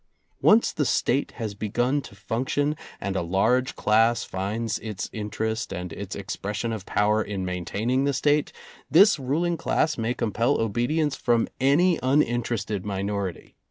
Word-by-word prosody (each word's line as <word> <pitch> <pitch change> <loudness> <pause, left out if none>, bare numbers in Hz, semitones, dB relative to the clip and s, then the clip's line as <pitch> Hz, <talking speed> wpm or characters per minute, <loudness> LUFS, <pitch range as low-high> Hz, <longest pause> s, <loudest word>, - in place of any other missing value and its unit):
Once 220 +2 +5
the 150 - -1
State 135 0 +1
has 110 -4 -4
begun 120 +7 0
to 100 - -13
func 115 +6 -3
tion, 145 +1 +1 0.2
and 100 0 -3
a - - +1
large 100 +9 +1
class 115 +1 +3
finds 105 +4 -3
its 105 -3 -5
interest 110 +1 -3
and 90 -3 -5
its - - -6
expression 105 +3 -4
of 105 -4 -6
power 105 +1 +2
in 100 -3 -3
maintaining 100 +8 -1
the 140 - +2
State, 145 +2 +1 0.4
this 195 +2 +6
ruling 165 +6 0
class 155 -4 0
may 115 +2 -1
compel 115 +4 0
obedience 125 +7 0
from 120 -2 +1
any 160 +6 +3
un 135 +4 +3
interested 115 -4 -2
minority. 100 -2 -4
115 Hz, 155 wpm, -25 LUFS, 100-135 Hz, 0.4 s, this